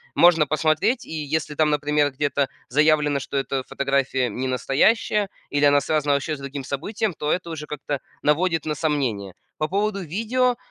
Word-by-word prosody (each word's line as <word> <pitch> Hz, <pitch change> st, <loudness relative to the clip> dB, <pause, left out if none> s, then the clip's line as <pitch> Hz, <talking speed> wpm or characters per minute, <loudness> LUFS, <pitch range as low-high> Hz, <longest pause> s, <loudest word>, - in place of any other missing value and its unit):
Можно 165 Hz, -3 st, +5 dB
посмотреть. 155 Hz, -, +1 dB
И -, -, -12 dB
если 155 Hz, 0 st, -2 dB
там, 155 Hz, +1 st, +2 dB
например, 150 Hz, 0 st, +1 dB
где-то 140 Hz, 0 st, 0 dB, 0.2 s
заявлено, 150 Hz, +1 st, +3 dB
что 140 Hz, +1 st, -4 dB
эта 135 Hz, -1 st, -1 dB
фотография 135 Hz, -2 st, 0 dB
ненастоящая 135 Hz, -, +1 dB, 0.2 s
или 145 Hz, 0 st, +1 dB
она 145 Hz, 0 st, +5 dB
связана 150 Hz, -1 st, +1 dB
вообще 140 Hz, +3 st, -1 dB
с -, -, -12 dB
другим 140 Hz, 0 st, -6 dB
событием, 200 Hz, +10 st, -2 dB
то 150 Hz, 0 st, -2 dB
это 180 Hz, -2 st, -1 dB
уже 150 Hz, -2 st, -6 dB
как-то 145 Hz, -1 st, -4 dB, 0.2 s
наводит 165 Hz, +1 st, +2 dB
на 155 Hz, -1 st, -1 dB
сомнение. 130 Hz, -, -1 dB, 0.2 s
По 155 Hz, -, -1 dB
поводу 200 Hz, +2 st, -1 dB
видео, 230 Hz, +9 st, 0 dB
150 Hz, 165 wpm, -23 LUFS, 140-165 Hz, 0.2 s, Можно